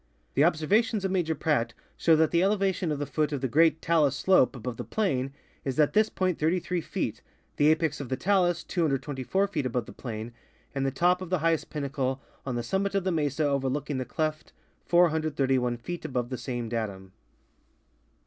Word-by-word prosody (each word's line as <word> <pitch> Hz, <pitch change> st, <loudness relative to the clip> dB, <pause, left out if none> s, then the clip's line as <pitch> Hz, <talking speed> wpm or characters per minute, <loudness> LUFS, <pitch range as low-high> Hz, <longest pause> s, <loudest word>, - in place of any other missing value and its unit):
The 140 Hz, -, +4 dB
observations 195 Hz, +7 st, +2 dB
of 190 Hz, -, 0 dB
Major 170 Hz, -4 st, 0 dB
Pradt 130 Hz, -6 st, 0 dB, 0.2 s
show 165 Hz, -, +4 dB
that 160 Hz, 0 st, +3 dB
the 170 Hz, -, +3 dB
elevation 195 Hz, -3 st, +1 dB
of 150 Hz, -, -1 dB
the 145 Hz, -, -2 dB
foot 150 Hz, 0 st, -1 dB
of 145 Hz, -, -1 dB
the 135 Hz, -, 0 dB
great 160 Hz, +5 st, +3 dB
talus 155 Hz, -5 st, +3 dB
slope 185 Hz, -6 st, +3 dB
above 125 Hz, -1 st, -5 dB
the -, -, -4 dB
plain 135 Hz, -12 st, -1 dB, 0.3 s
is 135 Hz, +1 st, -3 dB
at 150 Hz, -, +4 dB
this 215 Hz, +1 st, +4 dB
point 185 Hz, -3 st, -1 dB
33 175 Hz, +2 st, 0 dB
feet, 120 Hz, -, -3 dB, 0.4 s
the 145 Hz, -, +4 dB
apex 155 Hz, -1 st, +2 dB
of 135 Hz, -, -7 dB
the 130 Hz, -, -1 dB
talus 175 Hz, -2 st, +2 dB
224 150 Hz, +2 st, 0 dB
feet 150 Hz, -8 st, -1 dB
above 125 Hz, -1 st, -2 dB
the -, -, -11 dB
plain, 115 Hz, -1 st, -6 dB, 0.4 s
and 135 Hz, -1 st, 0 dB
the -, -, +3 dB
top 175 Hz, +7 st, +2 dB
of 185 Hz, -, -6 dB
the 185 Hz, -, +2 dB
highest 165 Hz, 0 st, 0 dB
pinnacle 135 Hz, -3 st, -2 dB, 0.3 s
on 125 Hz, -, -1 dB
the 120 Hz, -, -2 dB
summit 195 Hz, +9 st, -1 dB
of 195 Hz, -, +1 dB
the 185 Hz, -, 0 dB
mesa 150 Hz, -2 st, 0 dB
overlooking 140 Hz, 0 st, -1 dB
the -, -, -1 dB
cleft 155 Hz, +5 st, -3 dB, 0.3 s
431 145 Hz, -8 st, +2 dB
feet* 175 Hz, +9 st, -6 dB
above 125 Hz, -5 st, -2 dB
the 130 Hz, -, -2 dB
same 120 Hz, -3 st, -4 dB
datum. 100 Hz, -5 st, -4 dB
150 Hz, 190 wpm, -28 LUFS, 130-175 Hz, 0.4 s, The